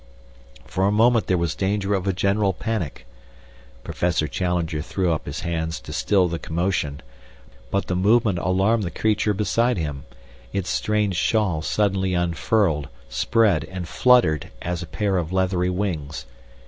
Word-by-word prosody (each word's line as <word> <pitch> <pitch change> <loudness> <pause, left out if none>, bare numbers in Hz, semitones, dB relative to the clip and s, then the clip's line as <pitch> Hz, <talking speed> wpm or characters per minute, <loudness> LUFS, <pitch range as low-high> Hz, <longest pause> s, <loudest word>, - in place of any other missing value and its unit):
For 95 +1 0
a - - +2
moment 115 +2 +3
there 90 - +2
was 85 -2 0
danger 100 +2 -1
of 95 -1 -1
a - - +3
general 100 +2 +1
panic. 90 - -4 0.8
Professor 85 -3 0
Challenger 85 -1 -1
threw 90 +2 0
up 80 - -4
his - - -4
hands 80 -1 -2
to - - -8
still 95 -3 +2
the 85 -1 -3
commotion, 80 -4 -2 0.7
but 100 - 0
the 90 - -2
movement 105 0 +3
alarmed 95 +6 +2
the 90 - -2
creature 105 +4 0
beside 115 +5 +1
him. 75 -3 -4 0.5
Its 95 -2 -2
strange 105 -4 0
shawl 100 -8 +1
suddenly 95 0 0
unfurled, 85 -2 +1 0.2
spread, 90 - +2
and 90 -2 -6
fluttered 90 - +3
as 90 -1 -2
a 85 - -6
pair 100 +3 -1
of 85 -1 -2
leathery 95 -1 +1
wings. 90 -6 -3
95 Hz, 150 wpm, -23 LUFS, 85-105 Hz, 0.8 s, moment